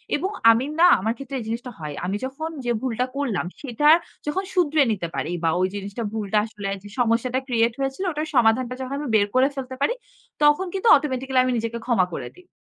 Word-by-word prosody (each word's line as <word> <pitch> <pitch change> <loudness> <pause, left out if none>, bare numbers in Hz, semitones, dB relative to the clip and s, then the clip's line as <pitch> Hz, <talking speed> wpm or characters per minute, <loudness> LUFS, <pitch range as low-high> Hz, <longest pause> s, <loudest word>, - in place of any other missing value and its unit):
এবং 385 +2 -2 0.2
আমি 235 +4 +1
না 355 - +8
আমার 220 +4 0
ক্ষেত্রে 275 0 -7
এই - - -5
জিনিসটা 240 +2 -4
হয়। 150 -2 -5
আমি 195 +3 -1
যখন 310 +5 -5 0.2
যে 240 - +1
ভুলটা 250 -1 -1
করলাম, 240 -11 -1 0.2
সেটা 290 +2 +2 0.4
যখন 375 +6 -1
শুধরে 310 -4 +3
নিতে 180 -5 -2
পারি 170 - -2
বা 165 - +3
ওই 185 - +3
জিনিসটা 200 +3 -5
ভুলটা 210 -1 -1
আসলে 205 -3 -6
যে - - -10
সমস্যাটা 240 +2 +1
ক্রিয়েট 230 -1 +2
হয়েছিল 270 +7 -2
ওটার 305 +1 -3
সমাধানটা 245 +1 +3
যখন 260 +2 -4
আমি 295 - -4
বের 205 -1 +4
করে 260 +1 +5
ফেলতে 260 -1 -5
পারি, 480 - +2 0.5
তখন 295 +6 +4
কিন্তু 390 +4 -1
অটোমেটিক্যালি 265 -2 0
আমি 255 - 0
নিজেকে 230 +1 -3
ক্ষমা 230 -7 +3
করে - - -5
দিই। 360 0 -18
255 Hz, 205 wpm, -23 LUFS, 225-285 Hz, 0.5 s, না